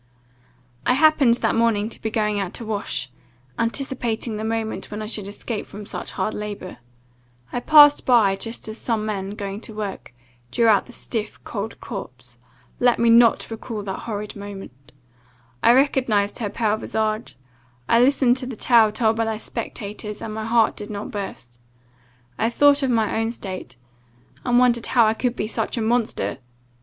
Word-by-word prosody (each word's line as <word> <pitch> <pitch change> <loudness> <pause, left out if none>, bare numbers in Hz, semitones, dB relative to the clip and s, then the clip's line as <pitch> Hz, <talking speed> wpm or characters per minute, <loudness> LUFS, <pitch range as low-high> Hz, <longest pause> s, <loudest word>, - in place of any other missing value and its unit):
"I - - +3
happened 285 -5 +5
that - - +1
morning 225 -2 +2
to - - -13
be 220 - -2
going 210 -2 0
out 195 -1 -3
to 235 - -6
wash, 200 - -3 0.5
anticipating 235 -2 -1
the 215 - -4
moment 220 0 -3
when 210 - -5
I 215 - -4
should 210 -2 -4
escape 210 +2 -5
from 205 +1 -9
such - - -6
hard 215 - -2
labour. 205 -3 -6 0.8
I - - 0
passed 290 +2 +7
by, 225 -6 +4
just 225 +4 -5
as 220 +1 -7
some 220 -3 -1
men, 200 -1 -3
going 200 0 -5
to 220 - -6
work, 205 -9 -5 0.4
drew 235 - +1
out 210 -3 +4
the - - -12
stiff, 220 -3 -4
cold 220 0 -5
corpse 125 - -9 0.4
Let 245 -1 +4
me 230 0 +4
not 230 0 +5
recall 225 -1 -5
the 195 -1 -4
horrid 210 0 -5
moment! 195 -10 -10 0.7
I 235 - +6
recognized 245 -6 +2
her 215 -3 -2
pale 215 0 0
visage; 215 - -2 0.5
I 230 - +4
listened 255 -1 +4
to 255 -1 -4
the 255 - -6
tale 225 -1 +4
told 220 0 +1
by 225 - +1
the 220 -1 -2
spectators, 210 -1 -6
and 215 - -6
my 220 0 -4
heart 225 -1 +3
did 210 +1 -7
not 205 0 -5
burst. 120 - -7 0.8
I 225 - +2
thought 285 +3 +4
of 270 - +1
my 225 -2 +1
own 225 0 0
state, 185 - -7 0.7
and 245 0 +2
wondered 240 -2 +3
how 235 -3 +4
I 215 - +3
could 245 +2 -1
be 210 - -2
such 225 +1 -2
a - - 0
monster! 220 - 0
220 Hz, 175 wpm, -22 LUFS, 205-235 Hz, 0.8 s, passed